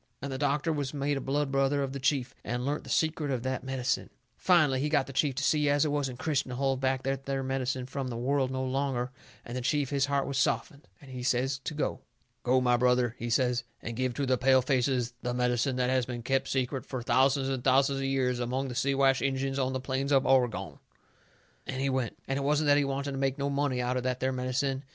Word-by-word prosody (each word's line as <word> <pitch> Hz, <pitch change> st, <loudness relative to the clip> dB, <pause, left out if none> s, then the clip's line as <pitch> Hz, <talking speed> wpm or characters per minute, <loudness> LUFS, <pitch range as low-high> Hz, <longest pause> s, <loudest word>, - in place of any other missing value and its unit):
And 140 Hz, -, -5 dB
the 130 Hz, -, -4 dB
doctor 145 Hz, +3 st, +1 dB
was 145 Hz, -1 st, -3 dB
made 145 Hz, +1 st, 0 dB
a 135 Hz, -, -3 dB
blood 140 Hz, +1 st, -1 dB
brother 135 Hz, +1 st, +2 dB
of 135 Hz, -1 st, -4 dB
the 140 Hz, -, -4 dB
chief, 130 Hz, -2 st, 0 dB
and 125 Hz, +1 st, -3 dB
learnt 145 Hz, +2 st, -2 dB
the -, -, -10 dB
secret 155 Hz, -2 st, 0 dB
of 125 Hz, -3 st, -1 dB
that 130 Hz, -1 st, -2 dB
medicine. 130 Hz, -1 st, -1 dB, 0.3 s
Finally 155 Hz, -8 st, +3 dB
he 150 Hz, +3 st, 0 dB
got 150 Hz, -3 st, +2 dB
the 135 Hz, -, -9 dB
chief 135 Hz, 0 st, +1 dB
to 145 Hz, -, -2 dB
see 150 Hz, 0 st, +3 dB
as 145 Hz, +1 st, +3 dB
it 150 Hz, -, 0 dB
wasn't 135 Hz, -4 st, -1 dB
Christian 140 Hz, -2 st, -1 dB
to 125 Hz, -, -4 dB
hold 135 Hz, 0 st, 0 dB
back 130 Hz, 0 st, 0 dB
that 135 Hz, 0 st, -3 dB
there 135 Hz, -1 st, -1 dB
medicine 130 Hz, -1 st, -2 dB
from 135 Hz, +1 st, -4 dB
the 120 Hz, -2 st, -4 dB
world 130 Hz, +2 st, +1 dB
no 130 Hz, 0 st, -2 dB
longer, 130 Hz, -1 st, -1 dB, 0.3 s
and 120 Hz, -, -6 dB
the 125 Hz, -, -2 dB
chief, 145 Hz, +2 st, 0 dB
his 140 Hz, -1 st, +1 dB
heart 140 Hz, -1 st, +1 dB
was 140 Hz, -1 st, -2 dB
softened, 140 Hz, +1 st, -1 dB
and 140 Hz, -4 st, -14 dB
he 125 Hz, -1 st, -6 dB
says 130 Hz, +2 st, 0 dB
to 155 Hz, -, -3 dB
go. 150 Hz, -, -1 dB, 0.4 s
"Go, 130 Hz, +1 st, +3 dB
my 125 Hz, -1 st, +3 dB
brother," 125 Hz, -1 st, +2 dB
he 120 Hz, -, -3 dB
says, 125 Hz, 0 st, +1 dB, 0.2 s
"and 115 Hz, -, -6 dB
give 130 Hz, 0 st, -1 dB
to 140 Hz, -, -1 dB
the 130 Hz, -1 st, +1 dB
pale 130 Hz, 0 st, +4 dB
faces 125 Hz, -2 st, +1 dB
the 125 Hz, 0 st, -2 dB
medicine 125 Hz, +1 st, +1 dB
that 125 Hz, 0 st, +1 dB
has 130 Hz, -2 st, +1 dB
been 120 Hz, -2 st, -5 dB
kept 135 Hz, +2 st, 0 dB
secret 130 Hz, 0 st, -1 dB
fur 130 Hz, -3 st, -5 dB
thousands 135 Hz, +2 st, +3 dB
and 130 Hz, -2 st, -2 dB
thousands 135 Hz, +1 st, +3 dB
of 135 Hz, -, -2 dB
years 130 Hz, -2 st, 0 dB
among 130 Hz, +3 st, -2 dB
the -, -, -5 dB
Siwash 135 Hz, 0 st, +2 dB
Injuns 135 Hz, 0 st, -1 dB
on 130 Hz, 0 st, 0 dB
the 130 Hz, -, -1 dB
plains 135 Hz, +2 st, -2 dB
of 135 Hz, -1 st, +4 dB
Oregon." 125 Hz, -4 st, +1 dB, 0.9 s
And 130 Hz, 0 st, -4 dB
he 135 Hz, 0 st, +1 dB
went. 130 Hz, -4 st, -2 dB
It 135 Hz, +1 st, -1 dB
wasn't 150 Hz, +2 st, +2 dB
that 145 Hz, -, +6 dB
he 145 Hz, -, +1 dB
wanted 140 Hz, +1 st, -2 dB
to 135 Hz, -, -4 dB
make 135 Hz, 0 st, 0 dB
no 140 Hz, 0 st, -1 dB
money 140 Hz, -2 st, 0 dB
out 125 Hz, +1 st, 0 dB
of -, -, -1 dB
that 125 Hz, 0 st, -2 dB
there 130 Hz, +1 st, 0 dB
medicine. 130 Hz, +1 st, -1 dB
135 Hz, 245 wpm, -29 LUFS, 125-140 Hz, 0.9 s, that